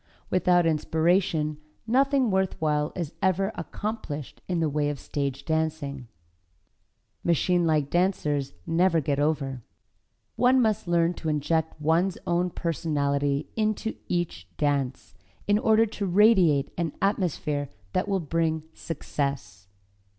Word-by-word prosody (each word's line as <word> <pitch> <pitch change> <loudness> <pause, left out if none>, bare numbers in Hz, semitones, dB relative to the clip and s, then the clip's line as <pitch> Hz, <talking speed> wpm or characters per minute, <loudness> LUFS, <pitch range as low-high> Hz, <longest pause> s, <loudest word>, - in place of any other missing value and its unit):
Without 180 -1 +3
inspiration 160 -1 +1 0.3
nothing 265 0 +3
worthwhile 155 -6 0
is 170 -3 -4
ever 190 +2 +2
accomplished 205 - -5
in 180 -2 0
the 160 - +2
way 145 0 0
of 145 -2 -4
stage 140 -2 -3
dancing. 160 -5 -2 1.2
Machine 175 +1 +2
like 150 -3 +1
dancers 150 - 0
never 170 0 +3
get 140 -1 -1
over. 145 -4 0 0.8
One 255 +1 +5
must 220 -6 +1
learn 170 0 +2
to 160 - -4
inject 155 +2 0
one's 165 +5 +1
own 175 0 +1
personality 145 -4 -1
into 215 0 0
each 175 - -2
dance, 135 -9 -1 0.3
in 205 +1 +3
order 220 0 +4
to 205 -2 -4
radiate 180 -7 +4
an 165 -3 -1
atmosphere 155 -7 -1 0.2
that 185 - 0
will 195 -1 +1
bring 160 -1 -1
success. 140 - -4
165 Hz, 120 wpm, -26 LUFS, 145-185 Hz, 1.2 s, One